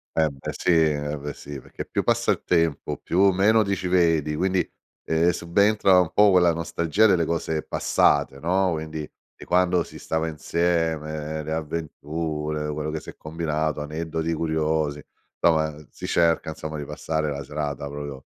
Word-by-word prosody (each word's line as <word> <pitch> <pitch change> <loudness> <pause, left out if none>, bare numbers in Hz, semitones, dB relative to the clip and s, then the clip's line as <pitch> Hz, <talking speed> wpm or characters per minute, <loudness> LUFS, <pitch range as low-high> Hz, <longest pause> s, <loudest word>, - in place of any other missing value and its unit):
Eh 80 -1 +3
beh 70 - -6
sì - - -1
eh 75 -2 +2
beh 75 0 -5
sì, 70 -2 -8
perché - - -8
più - - -1
passa - - +2
il - - -2
tempo, 80 -4 0
più 95 +3 +3
meno 105 +4 +4
ti 100 -1 0
ci 95 -1 -4
vedi, 80 -4 +2
quindi, 95 +1 +1 0.4
uhm, 80 +2 +2
subentra 95 +2 +3
un 90 -3 +1
po' 105 -1 +5
quella 90 -2 +5
nostalgia 85 +4 +1
delle 90 -5 +4
cose 80 -1 -1
passate, 70 -1 +1
no. 90 +3 +1
Quindi 80 -1 -4 0.3
di - - -12
quando 90 -1 +2
si - - -12
stava 80 0 -1
insieme, 80 -1 -1
le 80 - -5
avventure, 75 -1 -3
quello 75 +1 -3
che 80 0 -3
si - - -11
è - - -25
combinato, 80 -1 -2
aneddoti 80 +2 -3
curiosi, 80 -2 0 0.4
somma 80 -2 +2 0.2
si - - -7
cerca, 85 -1 +2
insomma, 80 0 -6
di 70 - -5
passare 80 0 -2
la 70 0 -4
serata 70 -1 -4
proprio 70 -1 -7
80 Hz, 165 wpm, -24 LUFS, 75-85 Hz, 0.4 s, po